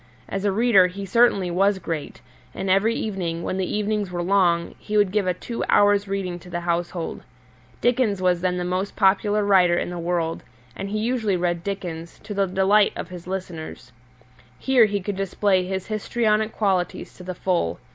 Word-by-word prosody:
As 195 Hz, +1 st, -3 dB
a 200 Hz, -, +3 dB
reader 205 Hz, -3 st, +5 dB
he 195 Hz, +2 st, -7 dB
certainly 195 Hz, -3 st, +3 dB
was 195 Hz, +3 st, +2 dB
great, 165 Hz, -4 st, -5 dB, 0.3 s
and 190 Hz, -, -1 dB
every 210 Hz, +4 st, +3 dB
evening, 175 Hz, -6 st, -3 dB
when 185 Hz, -, -2 dB
the 190 Hz, -1 st, -2 dB
evenings 210 Hz, -1 st, -1 dB
were 175 Hz, -1 st, -3 dB
long, 175 Hz, -3 st, +2 dB
he 210 Hz, 0 st, -2 dB
would 205 Hz, -3 st, +3 dB
give 205 Hz, -2 st, 0 dB
a 180 Hz, -, +2 dB
two 230 Hz, +6 st, -5 dB
hours' 205 Hz, 0 st, +4 dB
reading 190 Hz, -3 st, -3 dB
to 180 Hz, -, -14 dB
the 175 Hz, 0 st, -3 dB
household. 170 Hz, 0 st, -2 dB, 0.6 s
Dickens 240 Hz, -5 st, +2 dB
was 180 Hz, -2 st, +1 dB
then 180 Hz, 0 st, 0 dB
the 180 Hz, -, -2 dB
most 185 Hz, +3 st, -2 dB
popular 205 Hz, +2 st, +2 dB
writer 180 Hz, -3 st, +4 dB
in 175 Hz, -, -2 dB
the 175 Hz, -, -5 dB
world, 170 Hz, -1 st, -1 dB, 0.3 s
and 195 Hz, -, -5 dB
he 215 Hz, -, -2 dB
usually 220 Hz, -3 st, 0 dB
read 175 Hz, -1 st, -1 dB
Dickens, 170 Hz, -4 st, -5 dB
to 210 Hz, -, -6 dB
the 200 Hz, -1 st, +1 dB
delight 195 Hz, +3 st, +3 dB
of -, -, -6 dB
his 180 Hz, -1 st, -10 dB
listeners. 165 Hz, -9 st, -6 dB, 0.7 s
Here 260 Hz, -4 st, +4 dB
he 205 Hz, -1 st, -2 dB
could 200 Hz, +1 st, -4 dB
display 195 Hz, -1 st, +1 dB
his 190 Hz, -1 st, -3 dB
histrionic 215 Hz, 0 st, 0 dB
qualities 190 Hz, -5 st, -1 dB
to 180 Hz, -, -11 dB
the 185 Hz, 0 st, -5 dB
full. 175 Hz, -, -1 dB
190 Hz, 185 wpm, -23 LUFS, 180-205 Hz, 0.7 s, reader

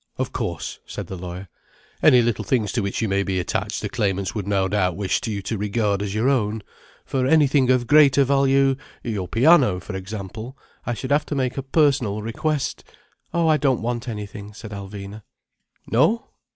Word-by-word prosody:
"Of -, -, -2 dB
course," -, -, -4 dB
said -, -, -6 dB
the 95 Hz, -, -7 dB
lawyer, 90 Hz, +1 st, -7 dB, 0.5 s
"any 125 Hz, -2 st, +6 dB
little 115 Hz, -2 st, 0 dB
things 115 Hz, -6 st, 0 dB
to 120 Hz, -, 0 dB
which 100 Hz, +3 st, -2 dB
you -, -, +1 dB
may 100 Hz, 0 st, +1 dB
be 95 Hz, -2 st, -1 dB
attached 90 Hz, -, -2 dB
the -, -, -1 dB
claimants 95 Hz, -2 st, -1 dB
would 105 Hz, -3 st, -4 dB
no 100 Hz, -2 st, +1 dB
doubt 95 Hz, -3 st, 0 dB
wish 100 Hz, -1 st, 0 dB
you 100 Hz, -3 st, -3 dB
to 110 Hz, +2 st, -3 dB
regard 105 Hz, -1 st, 0 dB
as 100 Hz, 0 st, -3 dB
your 110 Hz, +4 st, +1 dB
own. 110 Hz, -5 st, +1 dB, 0.4 s
For 130 Hz, -1 st, 0 dB
anything 140 Hz, -3 st, +4 dB
of 125 Hz, -1 st, +3 dB
greater 140 Hz, -1 st, +6 dB
value—your 135 Hz, -6 st, 0 dB
piano, 125 Hz, -, +4 dB
for 95 Hz, +2 st, -7 dB
example—I 110 Hz, +6 st, -7 dB
should 130 Hz, +4 st, -5 dB
have 145 Hz, +1 st, +2 dB
to 150 Hz, -, -3 dB
make 130 Hz, -2 st, -1 dB
a 135 Hz, -, -2 dB
personal 135 Hz, -7 st, +1 dB
request—" 135 Hz, +5 st, -2 dB, 0.5 s
"Oh, 170 Hz, -1 st, +1 dB
I 155 Hz, -1 st, +4 dB
don't 135 Hz, -6 st, +1 dB
want 120 Hz, +1 st, -2 dB
anything—" 105 Hz, -1 st, -7 dB
said 110 Hz, -1 st, -9 dB
Alvina. 100 Hz, +1 st, -8 dB, 0.6 s
"No? 160 Hz, -, +2 dB
115 Hz, 180 wpm, -23 LUFS, 100-135 Hz, 0.6 s, any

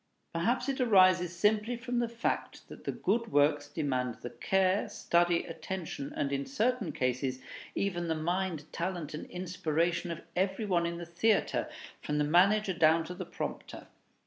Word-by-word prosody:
Perhaps 235 Hz, +10 st, 0 dB
it 270 Hz, -1 st, -1 dB
arises 185 Hz, -6 st, +5 dB
simply 215 Hz, +5 st, +2 dB
from 245 Hz, 0 st, -2 dB
the 240 Hz, -1 st, 0 dB
fact 230 Hz, 0 st, -3 dB
that -, -, -11 dB
the -, -, 0 dB
good 230 Hz, +3 st, -1 dB
works 145 Hz, 0 st, +3 dB
demand 130 Hz, -6 st, -1 dB
the 120 Hz, -, -5 dB
care, 190 Hz, -, +1 dB
study, 175 Hz, 0 st, +2 dB
attention, 175 Hz, -7 st, -5 dB
and, 140 Hz, -, -1 dB
in 140 Hz, 0 st, 0 dB
certain 250 Hz, -, 0 dB
cases, 130 Hz, 0 st, -1 dB, 0.4 s
even 175 Hz, -4 st, -1 dB
the 160 Hz, -, 0 dB
mind, 175 Hz, 0 st, -1 dB
talent, 170 Hz, -3 st, -3 dB
and 150 Hz, -, -6 dB
inspiration 175 Hz, -1 st, -1 dB
of 170 Hz, -1 st, -5 dB
every 190 Hz, +4 st, 0 dB
one 175 Hz, -4 st, +1 dB
in 170 Hz, 0 st, -4 dB
the 170 Hz, -, -6 dB
theatre, 195 Hz, +6 st, +1 dB, 0.3 s
from 150 Hz, -, -2 dB
the 150 Hz, -, +3 dB
manager 190 Hz, +6 st, +4 dB
down 165 Hz, 0 st, +4 dB
to 175 Hz, -, -7 dB
the 180 Hz, -1 st, -7 dB
prompter. -, -, -6 dB
175 Hz, 165 wpm, -31 LUFS, 155-200 Hz, 0.4 s, arises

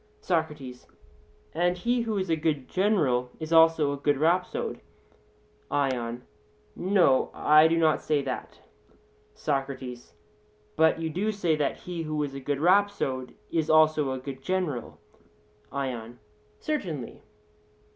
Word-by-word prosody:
SOCRATES: 150 Hz, -7 st, -3 dB, 0.7 s
And 175 Hz, +2 st, +1 dB
he 240 Hz, +6 st, 0 dB
who 225 Hz, -3 st, -2 dB
is 185 Hz, -3 st, -1 dB
a -, -, +4 dB
good 150 Hz, -4 st, -1 dB
general 155 Hz, -, +1 dB
is 160 Hz, +1 st, -4 dB
also 160 Hz, -3 st, +5 dB
a -, -, -4 dB
good 145 Hz, 0 st, +1 dB
rhapsode? 170 Hz, +5 st, 0 dB, 0.9 s
ION: 125 Hz, -4 st, -1 dB, 0.5 s
No; 180 Hz, -8 st, +3 dB
I 155 Hz, +1 st, +6 dB
do 165 Hz, +1 st, +1 dB
not 160 Hz, -2 st, +3 dB
say 150 Hz, -2 st, 0 dB
that. -, -, -6 dB, 0.7 s
SOCRATES: 135 Hz, -3 st, -4 dB, 0.6 s
But 160 Hz, +1 st, +3 dB
you 160 Hz, -1 st, -3 dB
do 205 Hz, +7 st, -1 dB
say 175 Hz, -6 st, 0 dB
that 150 Hz, -2 st, -1 dB
he 175 Hz, -2 st, -6 dB
who 155 Hz, -1 st, -2 dB
is 140 Hz, -2 st, -4 dB
a 135 Hz, -, -6 dB
good 140 Hz, +1 st, -2 dB
rhapsode 170 Hz, -8 st, +1 dB, 0.2 s
is 160 Hz, -2 st, 0 dB
also 155 Hz, -2 st, +4 dB
a 130 Hz, -, -2 dB
good 130 Hz, 0 st, -7 dB
general. 165 Hz, -8 st, -3 dB, 0.7 s
ION: 120 Hz, -4 st, -4 dB, 0.4 s
Certainly. 170 Hz, -, -4 dB
155 Hz, 130 wpm, -27 LUFS, 135-175 Hz, 0.9 s, I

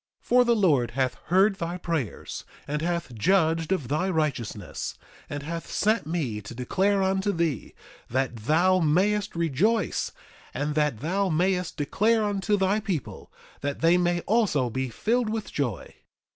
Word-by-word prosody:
3:4 -, -, -35 dB
For 250 Hz, 0 st, +5 dB
the 235 Hz, -1 st, +4 dB
Lord 145 Hz, -, +3 dB
hath 130 Hz, -2 st, +1 dB
heard 190 Hz, +5 st, +4 dB
thy 170 Hz, 0 st, -3 dB
prayers, 165 Hz, -, -4 dB, 0.2 s
and 150 Hz, +1 st, -2 dB
hath 170 Hz, -6 st, -2 dB
judged 165 Hz, -, +2 dB
of 155 Hz, -10 st, 0 dB
thy 155 Hz, +8 st, 0 dB
righteousness, 135 Hz, -, -2 dB, 0.3 s
and 145 Hz, -1 st, -5 dB
hath 165 Hz, +2 st, -5 dB
sent 215 Hz, -6 st, +1 dB
me 140 Hz, -11 st, -2 dB
to 105 Hz, +4 st, -9 dB
declare 195 Hz, -, +1 dB
unto 190 Hz, +2 st, +1 dB
thee 165 Hz, -, -2 dB, 0.3 s
that 130 Hz, 0 st, 0 dB
thou 165 Hz, +11 st, +3 dB
mayest 195 Hz, +6 st, +1 dB
rejoice; 170 Hz, -, +1 dB, 0.4 s
and 145 Hz, +1 st, -1 dB
that 150 Hz, -7 st, 0 dB
thou 190 Hz, +5 st, 0 dB
mayest 180 Hz, +2 st, 0 dB
declare 215 Hz, +10 st, +2 dB
unto 205 Hz, 0 st, 0 dB
thy 195 Hz, +2 st, +2 dB
people, 195 Hz, -, -4 dB, 0.3 s
that 145 Hz, 0 st, -3 dB
they 165 Hz, +2 st, +5 dB
may 175 Hz, -1 st, +1 dB
also 185 Hz, -, +1 dB
be 130 Hz, +2 st, -2 dB
filled 230 Hz, -, 0 dB
with 220 Hz, -1 st, -4 dB
joy. 120 Hz, -, -3 dB
170 Hz, 155 wpm, -26 LUFS, 145-195 Hz, 0.4 s, For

